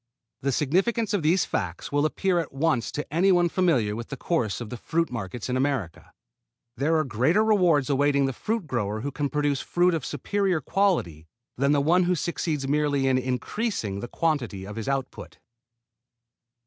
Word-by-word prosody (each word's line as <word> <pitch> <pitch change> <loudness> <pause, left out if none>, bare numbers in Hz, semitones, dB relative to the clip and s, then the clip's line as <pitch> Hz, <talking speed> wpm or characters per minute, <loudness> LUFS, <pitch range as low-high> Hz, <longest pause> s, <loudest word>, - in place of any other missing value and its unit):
The 140 - 0
significance 195 - +1
of 200 - +1
these 165 +4 +3
facts - - -4
will 145 +1 +2
appear 180 +3 0
at 165 - -4
once 135 -3 0
to 150 - -3
any 185 +4 +4
one 175 -1 +3
familiar 145 - +1
with 115 +1 -6
the 135 - -6
course 125 - -1
of 120 -3 -7
the 125 - -5
fruit 165 +4 -1
markets 115 -1 -5
in 125 - -1
America. 130 - -2 0.6
There 150 +6 +1
are 155 - +2
greater 135 - +2
rewards 180 -10 +3
awaiting 140 0 +2
the 135 - -1
fruit 220 - -2
grower 110 -6 -2
who 140 +4 -3
can 145 +1 -2
produce 145 -2 0
fruit 175 0 +2
of 160 -5 -2
superior 195 -1 -1
quality 145 - 0 0.3
than 140 +2 +2
the 145 -1 +3
one 175 +5 +3
who 180 +1 +2
succeeds 155 -4 -2
merely 145 -1 +1
in 130 -1 +3
increasing 125 - -2
the 120 - -5
quantity 120 - -1
of 105 +1 -8
his 110 -1 -5
output. 135 -1 -4
145 Hz, 180 wpm, -26 LUFS, 125-175 Hz, 0.6 s, any